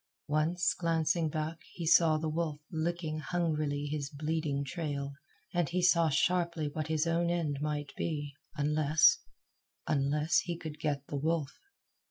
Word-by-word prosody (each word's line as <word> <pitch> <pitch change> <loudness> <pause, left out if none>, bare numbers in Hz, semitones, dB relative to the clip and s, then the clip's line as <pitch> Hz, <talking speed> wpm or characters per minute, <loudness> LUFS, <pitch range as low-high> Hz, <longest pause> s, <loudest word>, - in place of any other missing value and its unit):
Once, 160 +3 +2
glancing 165 -1 +1
back, 155 +2 -3
he 170 - -5
saw 160 -1 +5
the 160 +1 -2
wolf 155 -1 -2
licking 160 -1 -2
hungrily 155 -3 -1
his 145 -1 -3
bleeding 150 -1 -1
trail, 140 -1 -3 0.4
and 175 -4 +1
he 180 +1 0
saw 170 -2 +5
sharply 170 +1 +1
what 155 +1 -3
his 155 0 +1
own 170 +1 +1
end 160 -5 -1
might 145 -2 -2
be 145 -3 -3 0.2
unless 155 - +4 0.7
unless 150 +3 +2
he 175 -1 -3
could 155 -3 -7
get 145 -3 -1
the 145 - -4
wolf. 155 -1 -1
155 Hz, 145 wpm, -32 LUFS, 145-170 Hz, 0.7 s, saw